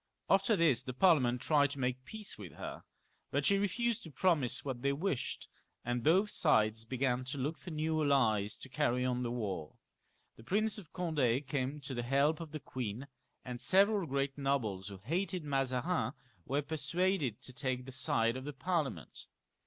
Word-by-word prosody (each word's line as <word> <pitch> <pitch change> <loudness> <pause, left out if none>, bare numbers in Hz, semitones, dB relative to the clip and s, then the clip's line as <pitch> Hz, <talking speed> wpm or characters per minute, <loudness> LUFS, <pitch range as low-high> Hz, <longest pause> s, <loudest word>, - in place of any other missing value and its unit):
After 195 +3 +4
this 165 -8 +3
the 125 - -6
Parliament 130 -8 +4
tried 145 -2 +3
to 140 - -6
make 125 -1 0
a 130 - -34
peace 220 -2 -5
with 100 -5 -9
her; - - -7 0.5
but 140 +1 0
she 200 0 +4
refdsed 235 +3 0
to 165 - -10
promise 150 -6 +1
what 130 -3 -3
they 140 +1 +2
wished, 145 -4 -2 0.4
and 120 0 0
both 185 - +4
sides 110 - +3
began 130 +1 0
to 130 +3 -4
look 145 +5 -1
for - - -9
new 155 0 0
allies 110 -8 +2
to - - -9
carry 125 0 +1
on 125 -1 0
the 120 - -1
war. 100 -10 -3 0.6
The 115 - -13
Prince 210 - 0
of 175 -7 -14
Condd 145 -7 +1
came 140 +1 -2
to 140 0 -5
the 120 - -2
help 140 +5 +2
of 165 -3 -7
the 155 - -5
queen, 125 -2 -5 0.4
and 125 -1 -5
several 195 - +4
great 140 0 -1
nobles 115 -9 0
who 100 -2 -7
hated 175 - -2
Mazarin 135 +4 0 0.3
were 140 +2 0
per 155 +2 -4
suaded 155 - 0
to 130 - -7
take 130 -1 -2
the 130 - -8
side 115 -3 +2
of 130 - -5
the 145 +1 -5
Parliament. 140 - -2
140 Hz, 185 wpm, -34 LUFS, 125-160 Hz, 0.6 s, After